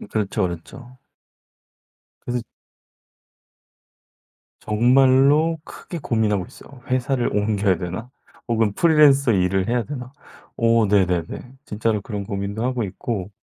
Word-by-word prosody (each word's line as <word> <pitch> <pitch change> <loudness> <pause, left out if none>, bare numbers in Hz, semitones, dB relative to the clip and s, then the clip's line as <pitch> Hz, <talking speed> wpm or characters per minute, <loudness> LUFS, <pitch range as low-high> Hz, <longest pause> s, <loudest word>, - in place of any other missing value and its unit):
음 - - -10
그렇죠, 105 0 -1
그렇죠. 120 +9 -6 1.3
그래서 125 0 -2 2.2
정말로 135 +8 +3
크게 175 - -8
고민하고 110 - 0
있어요. 135 -2 -15
회사를 130 -1 0
옮겨야 100 -3 +1
되나? 90 +7 -5 0.4
혹은 110 -3 +1
프리랜서 145 -5 +5
일을 95 0 +1
해야 120 0 +1
되나? 130 -3 -7 0.4
오 115 -1 +3
네네네. 95 +4 0
진짜로 110 -1 -1
그런 100 0 -5
고민도 100 +2 -4
하고 125 -1 -1
있고. 100 0 -5
115 Hz, 260 characters per minute, -22 LUFS, 100-130 Hz, 2.2 s, 프리랜서